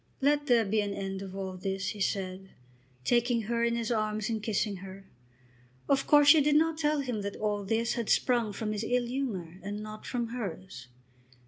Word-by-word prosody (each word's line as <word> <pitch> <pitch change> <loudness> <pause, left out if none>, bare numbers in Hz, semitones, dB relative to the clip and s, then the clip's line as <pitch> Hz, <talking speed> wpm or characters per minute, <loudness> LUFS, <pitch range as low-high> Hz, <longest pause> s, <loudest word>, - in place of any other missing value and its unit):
"Let 290 +1 +2
there 235 -3 +4
be 210 +2 +1
an 200 -1 -3
end 195 0 -4
of 190 -1 -7
all 190 -1 -4
this," 195 +1 -2
he 205 - -6
said, 190 -1 -2 0.5
taking 240 - +2
her 235 +2 -1
in 235 0 +2
his 235 0 -2
arms 215 -1 -1
and 220 -1 -2
kissing 210 -1 -1
her. 195 +1 -10 0.8
Of 275 -1 +2
course 290 -1 +7
she 315 0 +8
did 295 +1 +3
not 320 +1 +3
tell 300 -1 +2
him 245 -6 -3
that 200 0 -4
"all 210 -1 -1
this" 225 +3 0
had 235 -3 -3
sprung 240 -4 +2
from 215 +1 -3
his 210 0 -2
ill 245 +2 +1
humour 210 -10 -4
and 205 +3 -5
not 215 0 -8
from 240 -2 -2
hers. 190 - -6
215 Hz, 200 wpm, -30 LUFS, 195-245 Hz, 0.8 s, she